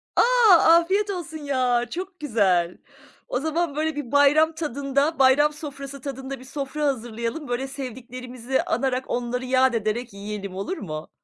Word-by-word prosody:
A! - - +5 0.4
Afiyet 375 +5 +4
olsun 340 -4 -5
ya. 255 -4 +1
Çok 365 +1 -6
güzel. 195 - +1 0.5
O 250 - -1
zaman, 315 0 -1
böyle 310 0 -1
bir 280 -5 -5
bayram 290 +3 +5
tadında, 285 0 -1
bayram 280 +3 +5
sofrası 280 -3 -8
tadında, 270 -1 -6
bir 255 - -13
sofra 280 +2 -3
hazırlayalım. 240 +2 -3
Böyle, 245 +2 -2
sevdiklerimizi 255 -1 -4
anarak, 260 +1 -1
onları 245 +1 -2
yâd 260 0 +3
ederek 225 +1 -2
yiyelim 200 -1 -6
olur 200 - -3
mu? 155 -4 -6
265 Hz, 145 wpm, -24 LUFS, 240-300 Hz, 0.5 s, A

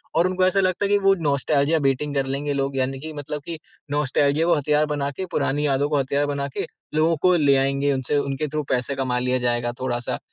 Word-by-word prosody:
और 170 +3 +4
उनको 185 0 +1
ऐसा 185 +1 +2
लगता 185 +1 +1
है - - -1
कि 205 - +5
वो 195 -1 +4
नॉस्टेल्जिया 140 +2 +2
बेटिंग 140 +1 0
कर 135 - +1
लेंगे 145 +1 -2
लोग। 135 0 -2
यानी 135 +1 -1
कि 155 +2 -7
मतलब 145 0 -5
कि 165 -1 -5 0.3
नॉस्टेल्जिया 145 +1 +1
को 175 - +4
हथियार 150 +1 +2
बना 140 -1 -1
के, 185 +7 -5
पुरानी 150 -4 -1
यादों 140 +1 +1
को 150 -2 +1
हथियार 140 +2 0
बना 140 -1 -2
के - - -1 0.3
लोगों 160 +2 +3
को 180 - +5
ले 145 -4 +4
आएँगे। 140 +1 +1
उनसे 130 +2 -1
उनके 140 +1 -1
थ्रू 150 +1 -3
पैसे 130 +2 0
कमा 130 -2 -1
लिया 125 +1 0
जाएगा 120 0 0
थोड़ा-सा। 120 -2 -2
145 Hz, 225 wpm, -23 LUFS, 135-155 Hz, 0.3 s, कि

